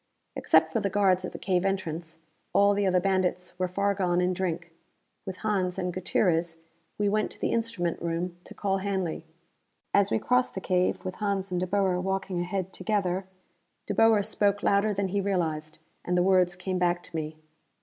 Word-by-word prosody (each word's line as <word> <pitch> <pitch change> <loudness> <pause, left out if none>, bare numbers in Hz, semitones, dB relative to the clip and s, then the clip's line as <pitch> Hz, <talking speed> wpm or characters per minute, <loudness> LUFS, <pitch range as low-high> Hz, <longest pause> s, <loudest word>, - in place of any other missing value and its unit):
Except - - +4
for 230 - +2
the 200 -2 -1
guards 190 -2 +2
at - - -5
the - - -7
cave 185 -2 0
entrance, 170 -4 -3 0.4
all 200 0 +5
the 200 -1 +1
other 185 -1 +3
bandits 180 -1 0
were 185 - +1
far 200 +2 0
gone 180 -3 +1
in 180 +1 +2
drink. 170 -2 -3 0.6
With 185 -1 -5
Hans 190 -4 0
and 180 -1 -2
Gutierrez, 170 -2 +1 0.4
we 210 - +1
went 215 +1 +1
to - - -20
the - - 0
instrument 225 -8 -1
room 170 +1 -2
to - - -12
call 195 -1 0
Hanley. 190 -4 -2 0.7
As 200 -1 +4
we - - +2
crossed 250 +3 +1
the - - -2
cave, 185 -1 0
with 185 - -4
Hans 200 -2 -1
and 180 - 0
De 185 - -1
Boer 190 -2 +1
walking 190 -1 -2
ahead 185 +1 -3
together, 190 -2 -1 0.6
De - - -2
Boer 225 -2 +5
spoke 205 -1 +1
louder 200 +2 +3
than 200 -1 -1
he 200 +2 0
realized, 160 -6 -1 0.3
and 180 0 0
the 175 - +4
words 185 -2 +3
came 185 0 -3
back 175 0 +1
to 175 - -9
me. 155 0 -4
185 Hz, 190 wpm, -28 LUFS, 180-200 Hz, 0.7 s, all